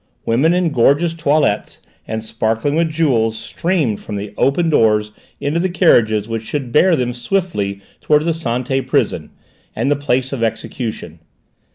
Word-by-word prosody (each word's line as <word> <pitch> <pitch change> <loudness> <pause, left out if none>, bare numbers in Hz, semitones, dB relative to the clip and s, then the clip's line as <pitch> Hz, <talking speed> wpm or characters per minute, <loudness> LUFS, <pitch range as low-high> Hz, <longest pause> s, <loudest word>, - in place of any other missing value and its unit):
Women 130 +8 +2
in 180 -3 +1
gorgeous 145 +6 +3
toilets 150 -8 0 0.3
and 110 0 -4
sparkling 115 +5 -1
with 165 +1 +1
jewels 125 -9 +1
streamed 165 - -1
from 105 - -6
the 100 0 -6
open 155 +9 +1
doors 105 -5 +3 0.3
into 150 +4 -1
the 185 +2 0
carriages 110 - +3
which 115 -1 -3
should 130 +2 -4
bear 175 +6 +4
them 125 -4 -1
swiftly 120 - -2 0.2
towards 150 0 +2
the 170 - +2
Santé 135 -3 -2
prison, - - 0 0.5
and 140 - 0
the - - +4
place 130 -2 -1
of 130 - -4
execution. 110 -6 -4
130 Hz, 155 wpm, -18 LUFS, 110-160 Hz, 0.5 s, bear